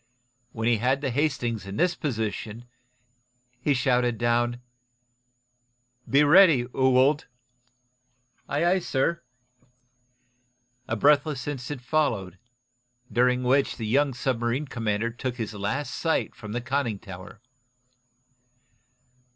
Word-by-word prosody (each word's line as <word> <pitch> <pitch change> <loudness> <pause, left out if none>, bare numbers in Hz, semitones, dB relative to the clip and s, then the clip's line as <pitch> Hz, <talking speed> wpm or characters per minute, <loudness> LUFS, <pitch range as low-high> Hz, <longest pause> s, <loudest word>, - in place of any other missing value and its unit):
When 115 0 -3
he 120 -1 +3
had 130 +5 +1
the 135 -3 -1
"Hastings" 120 -7 -1
in 95 - -6
this 175 +1 +2
position 110 - -4 0.9
he 140 +3 +1
shouted 125 -2 +1
down: 120 +1 +1 1.5
"Be 140 +2 +5
ready, 155 -5 +6
Ewald!" 130 +3 +3 1.2
"Aye, 150 +4 0
aye, 185 +2 +3
sir!" 170 +1 -1 1.7
A 115 - -1
breathless 145 +3 +2
instant 135 -1 -5
followed, 115 - -1 0.7
during 125 +1 +2
which 135 +3 +2
the 115 - -4
young 135 +4 +1
submarine 125 +2 -1
commander 115 -3 -2
took 120 +1 -4
his 115 -3 -5
last 125 +7 -3
sight 160 +4 -1
from 105 -2 -9
the 120 - -2
conning 125 -3 -1
tower. 95 -1 -11
125 Hz, 110 wpm, -26 LUFS, 115-145 Hz, 1.7 s, ready